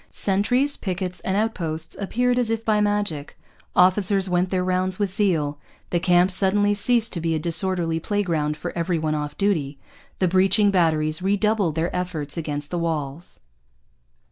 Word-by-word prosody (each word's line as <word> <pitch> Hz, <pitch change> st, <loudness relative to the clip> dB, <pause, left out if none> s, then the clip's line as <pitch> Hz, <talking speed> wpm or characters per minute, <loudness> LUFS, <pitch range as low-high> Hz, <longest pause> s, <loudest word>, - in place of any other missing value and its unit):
Sentries, 245 Hz, +9 st, +1 dB
piquets, 180 Hz, -1 st, -4 dB
and 190 Hz, +1 st, -2 dB
outposts 165 Hz, -7 st, -2 dB
appeared 245 Hz, +5 st, 0 dB
as 240 Hz, -3 st, +1 dB
if 225 Hz, 0 st, -2 dB
by 215 Hz, -1 st, +2 dB
magic. 205 Hz, -8 st, -1 dB, 0.4 s
Officers 190 Hz, +1 st, +3 dB
went 180 Hz, 0 st, +1 dB
their 185 Hz, -1 st, 0 dB
rounds 185 Hz, 0 st, 0 dB
with 200 Hz, -3 st, -1 dB
zeal. 160 Hz, -9 st, 0 dB, 0.3 s
The 175 Hz, -, +1 dB
camp 180 Hz, +2 st, +3 dB
suddenly 205 Hz, +2 st, +3 dB
ceased 225 Hz, +2 st, +1 dB
to 170 Hz, -, -1 dB
be 165 Hz, 0 st, 0 dB
a -, -, -1 dB
disorderly 170 Hz, 0 st, 0 dB
playground 165 Hz, -6 st, -1 dB
for -, -, -6 dB
every 170 Hz, 0 st, 0 dB
one 155 Hz, -1 st, -1 dB
off 150 Hz, -1 st, -4 dB
duty. 160 Hz, -9 st, 0 dB, 0.4 s
The 185 Hz, -, +2 dB
breaching 195 Hz, +3 st, +3 dB
batteries 155 Hz, -3 st, +1 dB
redoubled 200 Hz, -3 st, +1 dB
their 165 Hz, +2 st, -1 dB
efforts 165 Hz, -6 st, -3 dB
against 145 Hz, -3 st, -3 dB
the 175 Hz, -, -1 dB
walls. 160 Hz, -1 st, -4 dB
180 Hz, 160 wpm, -23 LUFS, 160-205 Hz, 0.4 s, Officers